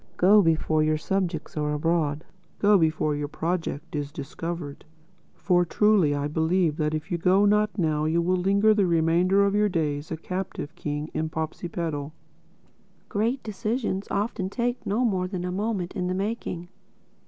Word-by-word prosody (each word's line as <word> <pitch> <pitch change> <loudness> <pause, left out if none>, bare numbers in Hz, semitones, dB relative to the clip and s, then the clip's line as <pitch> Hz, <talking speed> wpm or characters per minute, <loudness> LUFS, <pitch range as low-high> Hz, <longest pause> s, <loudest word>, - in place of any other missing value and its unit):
Go 205 +4 +6
before 160 -2 +2
your 155 0 +2
subjects 175 -1 -2
are 150 -1 -1
abroad. 155 -1 0 0.3
Go 210 0 +4
before 155 -4 +2
your 145 0 -3
project 165 -1 -3
is 145 -1 -3
discovered. 150 +1 -6 0.5
For 180 -2 +2
truly 185 -4 +3
I 145 0 -1
believe 160 +1 +1
that 155 0 0
if 155 +2 -6
you 170 - 0
go 190 +4 +4
not 210 +1 +2
now 155 -4 +1
you 160 +2 +2
will 180 +2 +2
linger 200 +4 +3
the 205 -3 +2
remainder 175 +4 +3
of 200 - +1
your 210 0 +3
days 150 -4 -2
a 160 - -2
captive 180 -2 -5
king 150 0 -4
in 160 0 -1
Popsipetel." 160 -2 -4 1.0
Great 230 +6 -1
decisions 215 -1 -2
often 200 -2 -1
take 245 +3 -2
no 230 +5 +1
more 185 -5 0
than 180 -2 -4
a 180 - -2
moment 195 -2 -2
in 180 -1 -1
the 185 - -1
making. 190 -4 -3
175 Hz, 165 wpm, -26 LUFS, 155-200 Hz, 1.0 s, Go